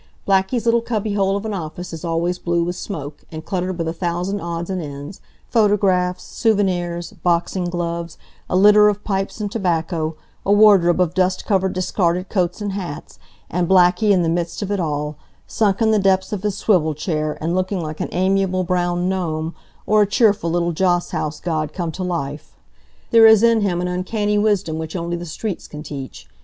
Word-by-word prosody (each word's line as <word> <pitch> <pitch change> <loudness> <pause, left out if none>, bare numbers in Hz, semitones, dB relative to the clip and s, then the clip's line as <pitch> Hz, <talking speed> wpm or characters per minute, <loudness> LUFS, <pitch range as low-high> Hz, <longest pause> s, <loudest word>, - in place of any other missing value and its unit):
Blackie's 195 +5 +1
little 235 0 +3
cubby 220 -3 -2
hole 195 -1 +1
of 200 - -6
an 215 - -3
office 175 -1 -6
is 160 - -7
always 170 +1 -1
blue 170 0 0
with 175 +1 -3
smoke, 150 -8 -7
and 160 -1 -7
cluttered 185 -1 -2
with 165 -2 -2
a 165 - -2
thousand 175 +3 -2
odds 170 0 -4
and 185 -1 -2
ends 145 +4 -8 0.3
photographs, 195 -5 +2
souvenirs, 175 -6 0
boxing 175 +1 0
gloves, 170 -1 -3 0.3
a - - 0
litter 210 +2 +7
of 205 0 -3
pipes 195 +1 -2
and 205 -1 -3
tobacco, 165 -5 -1 0.3
a 200 - 0
wardrobe 200 -5 +5
of 175 -2 +2
dust 185 0 0
covered 190 -3 +1
discarded 180 0 0
coats 180 0 -1
and 205 -1 -2
hats, 180 -7 -7 0.3
and 175 +1 -1
Blackie 185 +2 +4
in 185 -3 +3
the - - 0
midst 170 +3 -2
of 200 - -4
it 200 - 0
all, 150 -2 -2 0.3
sunk 210 0 +1
in 220 - +3
the 215 - +3
depths 190 0 +1
of 200 - -3
his 205 -1 -2
swivel 160 -7 +2
chair, 155 -1 -2
and 165 +2 -2
looking 185 +1 -1
like 155 -2 -5
an - - -3
amiable 185 0 +1
brown 175 0 0
gnome, 165 -4 -2 0.3
or 215 0 +4
a 205 - +3
cheerful 205 -3 +2
little 175 0 0
joss 175 +1 +1
house 150 0 -3
god 155 -3 -2
come 170 -3 -3
to 185 - -7
life. 155 -5 -4 0.6
There 225 -1 +8
is 220 0 +6
in 230 -1 +4
him 185 -4 0
an 180 - -1
uncanny 205 +4 -1
wisdom 200 -7 0
which 160 +1 -6
only 170 -1 -2
the 175 0 -6
streets 190 +4 -5
can 150 0 -8
teach. 135 -4 -8
180 Hz, 195 wpm, -20 LUFS, 170-200 Hz, 0.6 s, There